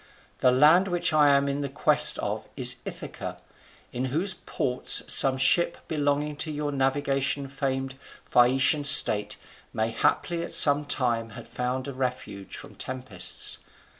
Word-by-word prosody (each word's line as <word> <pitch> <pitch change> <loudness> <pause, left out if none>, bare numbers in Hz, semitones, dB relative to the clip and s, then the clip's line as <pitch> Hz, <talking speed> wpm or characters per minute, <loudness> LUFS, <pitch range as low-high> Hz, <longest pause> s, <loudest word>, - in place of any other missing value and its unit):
The 125 - +2
land 155 +9 +3
which 175 -3 -2
I 150 -1 +3
am 140 0 +1
in 140 0 -4
quest - - +6
of - - -6
is - - +2
Ithaca; - - -9 0.5
in 125 +2 -4
whose 165 +9 -1
ports 125 -7 0
some 135 -1 +4
ship 170 +6 +1
belonging 145 -1 -3
to 155 - -4
your 150 0 -5
navigation 140 0 -2
famed 135 -1 -5 0.3
Phaeacian 135 +4 +1
state 125 -7 +5 0.4
may 110 0 -3
haply 170 +8 -2
at 170 - -7
some 150 -3 +5
time 120 -5 -2
have 120 - -12
found 125 +2 -5
a 140 - -7
refuge 125 -6 -7
from - - -13
tempests. 125 -9 -3
135 Hz, 140 wpm, -24 LUFS, 130-145 Hz, 0.5 s, quest